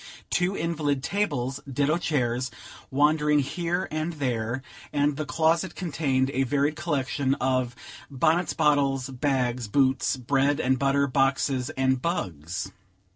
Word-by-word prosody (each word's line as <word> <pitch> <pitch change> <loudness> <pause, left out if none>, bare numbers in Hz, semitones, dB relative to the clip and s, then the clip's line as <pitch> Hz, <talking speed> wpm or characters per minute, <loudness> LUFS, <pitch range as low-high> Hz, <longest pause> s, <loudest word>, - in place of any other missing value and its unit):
Two 180 +2 +1
invalid 150 -5 -1
tables, 140 -10 -1
ditto 145 +5 +1
chairs, 125 -6 0 0.4
wandered 150 +2 +3
here 175 +6 -2
and 155 +2 -2
there, 125 -3 -2 0.3
and 145 0 +1
the 150 0 -4
closet 165 +6 +1
contained 140 -6 0
a 135 - 0
varied 145 +3 +1
collection 140 -3 0
of 130 -2 0 0.3
bonnets, 160 +5 +1
bottles, 135 -3 +2
bags, 125 -3 0
boots, 130 +3 +2
bread 140 +3 +1
and 130 -2 +1
butter, 140 +1 +2
boxes 135 -1 +1
and 130 -1 +2
bugs. 90 - -3
140 Hz, 125 wpm, -26 LUFS, 130-155 Hz, 0.4 s, wandered